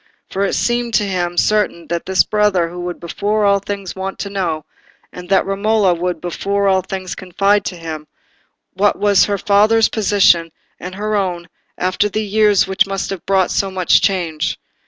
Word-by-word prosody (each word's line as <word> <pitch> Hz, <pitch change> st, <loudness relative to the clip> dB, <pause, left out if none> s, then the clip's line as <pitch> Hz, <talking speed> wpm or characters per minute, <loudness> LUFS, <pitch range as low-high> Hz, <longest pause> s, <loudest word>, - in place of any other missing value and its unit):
For 195 Hz, -, -1 dB
it 200 Hz, -, 0 dB
seemed 240 Hz, -1 st, 0 dB
to -, -, +3 dB
him 175 Hz, -3 st, -2 dB
certain 210 Hz, -5 st, +1 dB
that 170 Hz, 0 st, -3 dB
this 190 Hz, 0 st, +4 dB
brother 190 Hz, -5 st, 0 dB
would 175 Hz, 0 st, -5 dB
before 205 Hz, +5 st, -1 dB
all 200 Hz, 0 st, +4 dB
things 200 Hz, -1 st, -6 dB
want 190 Hz, 0 st, -5 dB
to 200 Hz, -, -5 dB
know, 170 Hz, -6 st, -2 dB, 0.5 s
and 180 Hz, 0 st, -10 dB
that 195 Hz, -, +3 dB
Romola 200 Hz, -1 st, +1 dB
would 175 Hz, 0 st, -3 dB
before 200 Hz, +4 st, -1 dB
all 190 Hz, -1 st, +3 dB
things 185 Hz, 0 st, -6 dB
confide 195 Hz, +3 st, 0 dB
to 180 Hz, -, -4 dB
him, 160 Hz, -2 st, -7 dB, 0.7 s
what 205 Hz, +2 st, +1 dB
was 200 Hz, -3 st, +4 dB
her 200 Hz, -1 st, -1 dB
father's 215 Hz, +2 st, +3 dB
position 190 Hz, -6 st, +3 dB, 0.3 s
and 180 Hz, +2 st, -7 dB
her 210 Hz, +2 st, -2 dB
own 175 Hz, -4 st, -2 dB, 0.3 s
after 185 Hz, +3 st, 0 dB
the 215 Hz, +2 st, -2 dB
years 210 Hz, -1 st, +3 dB
which 190 Hz, 0 st, +1 dB
must 195 Hz, 0 st, -3 dB
have 195 Hz, -, -7 dB
brought 190 Hz, -2 st, +2 dB
so 195 Hz, -, 0 dB
much 185 Hz, -2 st, +2 dB
change. 170 Hz, -6 st, -1 dB
195 Hz, 180 wpm, -17 LUFS, 180-205 Hz, 0.7 s, this